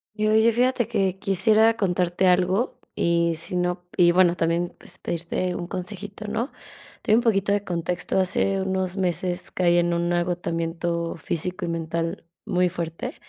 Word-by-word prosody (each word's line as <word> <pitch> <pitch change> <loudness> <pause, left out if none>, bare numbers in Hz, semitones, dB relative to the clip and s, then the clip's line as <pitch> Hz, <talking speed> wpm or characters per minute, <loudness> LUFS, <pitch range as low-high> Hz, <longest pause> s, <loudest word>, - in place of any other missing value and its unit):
Y, 215 0 0
oye, 220 +1 +5
fíjate 250 0 +1
que 190 -1 0
quisiera 215 +4 +3
contarte 180 -3 +1
algo, 185 +5 +2 0.2
y 170 0 +2
si 160 - -5
no 180 0 -1
y 175 -2 +6
bueno, 175 -1 +4
también, 170 +1 0
pues, - - -7
pedirte 175 +2 -2
un 175 -1 -5
consejito, 200 +3 -6
¿no? 230 +6 -2 0.5
Te - - +1
doy - - +7
un 240 - +1
poquito 200 -4 +2
de 205 -1 +1
contexto, 175 +1 -2
hace 195 +1 +1
unos 190 -1 -1
meses 180 -1 -1
caí 175 -1 +3
en 175 0 +2
un 170 0 0
agotamiento 170 -1 -1
físico 180 +3 -3
y - - -2
mental 165 0 -3 0.2
muy 180 0 +2
fuerte, 175 - -5
180 Hz, 165 wpm, -24 LUFS, 170-195 Hz, 0.5 s, doy